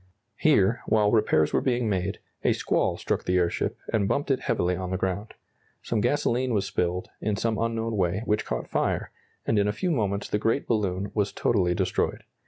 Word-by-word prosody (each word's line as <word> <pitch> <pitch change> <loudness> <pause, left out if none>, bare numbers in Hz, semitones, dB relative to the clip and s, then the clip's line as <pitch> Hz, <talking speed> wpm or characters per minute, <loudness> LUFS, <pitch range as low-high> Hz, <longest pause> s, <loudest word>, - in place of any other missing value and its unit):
Here, 100 +6 +3
while 105 -1 +3
repairs 105 -9 +3
were - - +3
being 125 -3 +1
made, 95 -4 -1 0.3
a - - +4
squall - - 0
struck - - -1
the 90 - +2
airship 85 -1 0 0.2
and 100 -3 +2
bumped 140 +6 0
it 130 - +2
heavily 90 -6 0
on 90 0 -4
the 95 - -1
ground. 95 +3 -3 0.5
Some 110 -3 0
gasoline 125 -1 +1
was 100 -2 +1
spilled, 90 -2 -2
in 105 -1 0
some 110 +1 -1
unknown 115 0 -1
way, 95 +2 0
which 105 0 +1
caught - - -3
fire, - - -1 0.3
and 110 - +2
in 100 - +2
a - - +2
few 175 - -1
moments 105 -7 0
the 105 - 0
great 115 +6 +1
balloon 100 -3 -1
was 105 -2 0
totally 90 -6 +1
destroyed. - - -1
105 Hz, 190 wpm, -26 LUFS, 95-115 Hz, 0.5 s, a